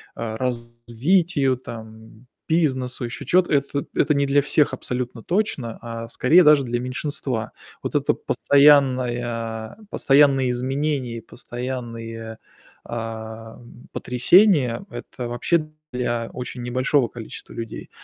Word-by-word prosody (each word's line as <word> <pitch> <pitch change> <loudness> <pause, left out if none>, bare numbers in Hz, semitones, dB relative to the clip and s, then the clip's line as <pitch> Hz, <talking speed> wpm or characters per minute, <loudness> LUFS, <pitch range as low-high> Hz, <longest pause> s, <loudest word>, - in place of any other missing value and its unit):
а, 110 -1 -4
развитию 125 +5 0
там, 110 -1 -11 0.2
бизнесу, 130 -6 0
ещё 120 +3 -6
чего-то- 180 0 +3
это 140 0 0
это 150 - +3
не 140 0 +2
для 140 +1 +4
всех 145 -2 +2
абсолютно 125 -2 -4
точно, 170 - -1
а 115 0 -6
скорее 165 +10 +5
даже 150 -2 +6
для 120 0 -1
меньшинства. 125 -2 -3 0.3
Вот - - -5
это - - +2
постоянное 120 -6 +2
постоянные 135 - +4
изменения 130 -1 -2
и - - -7
постоянные, 115 -3 -6 0.5
а, 115 -1 -6
м, 120 +1 -15
потрясения- 145 - +4
это 125 - -7
вообще 155 +6 0 0.2
для 120 -2 -2
очень 125 0 -6
небольшого 130 +1 +1
количества 115 -1 -9
людей. 115 -2 -7
125 Hz, 115 wpm, -23 LUFS, 115-140 Hz, 0.5 s, даже